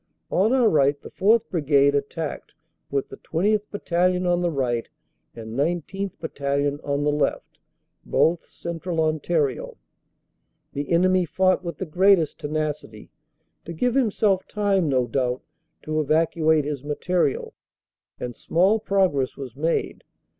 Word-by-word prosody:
On 205 +5 +3
our 255 -3 +4
right 145 -5 +3
the - - -12
4th. 215 +3 +3
Brigade 140 -4 +3
attacked 145 +2 -3 0.4
with 140 -1 -2
the - - -9
20th. 205 +6 0
Battalion 180 -2 0
on 175 0 +2
the 175 - +1
right 125 -6 -1 0.5
and 110 -1 -8
19th. 175 +7 -2
Battalion 140 -2 -1
on 140 0 -1
the 150 - +2
left, 150 0 -2 0.4
both 165 +1 +2
Central 170 0 -5
Ontario. 155 -3 0 1.0
The 145 0 -4
enemy 185 +1 +3
fought 185 +2 +1
with 170 -4 -5
the 190 - -4
greatest 180 -1 +3
tenacity, 150 -7 -4 0.5
to 170 - -7
give 245 +9 0
himself 215 -6 +1
time 200 -6 +1
no 130 -2 +2
doubt 125 +1 -1 0.4
to 155 0 -1
evacuate 155 0 +2
his 145 -3 -4
material, 150 +1 -1 0.7
and 120 -1 -5
small 190 +6 +2
progress 190 -11 +1
was 130 -4 -8
made. 160 +4 -1
160 Hz, 130 wpm, -24 LUFS, 140-185 Hz, 1.0 s, our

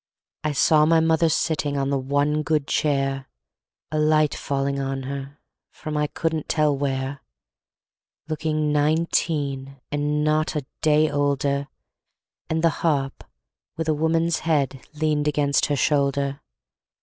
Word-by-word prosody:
I 155 -1 0
saw 150 +2 +4
my 165 0 +5
mother 160 0 +3
sitting 150 -2 0
On 135 0 0
the 140 - +1
one 145 +3 +1
good 150 -1 0
chair, 135 -2 0 0.6
A 155 - 0
light 155 -1 +3
falling 140 0 -2
on 135 0 -3
her 140 +1 -6 0.3
From 155 -1 -7
I 150 0 +1
couldn't 160 0 -3
tell 150 -2 +2
where, 135 0 -2 1.1
Looking 155 -1 -1
nineteen, 145 -3 0
And 150 +1 0
not 155 +1 +1
a 145 -3 -2 0.2
day 155 0 +3
older, 140 -1 0 0.8
And 160 +1 0
the 165 - +5
harp 140 -5 0 0.5
with 160 -1 -2
a 155 - +3
woman's 165 +2 +1
head 140 -5 0
Leaned 150 -1 0
against 145 -1 +2
her 145 - 0
shoulder. 140 -1 +1
150 Hz, 135 wpm, -23 LUFS, 140-155 Hz, 1.1 s, my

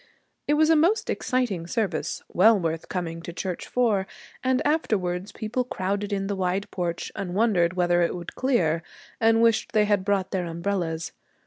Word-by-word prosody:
It 295 - +3
was 315 +1 +4
a - - +6
most 345 +8 +2
exciting 235 -10 -1
service, 215 0 -2
well 215 +3 +5
worth 165 -2 -3
coming 165 -2 -3
to 170 - -7
church 180 +1 -4
for, 215 -6 +1 0.4
and 260 0 +2
afterwards 195 - 0
people 225 +3 -2
crowded 200 -3 -3
in 195 -1 -1
the 200 0 -2
wide 190 +1 -1
porch 175 -2 -3
and 180 -2 -4
wondered 190 -6 +3
whether 175 -1 +2
it 170 - +1
would 175 -1 -7
clear, 175 - +1 0.4
and 225 -1 +4
wished 230 -1 +2
they 215 -1 +4
had 205 -2 +2
brought 195 -1 0
their 185 -2 -1
umbrellas. 170 -1 -2
195 Hz, 175 wpm, -25 LUFS, 175-225 Hz, 0.4 s, a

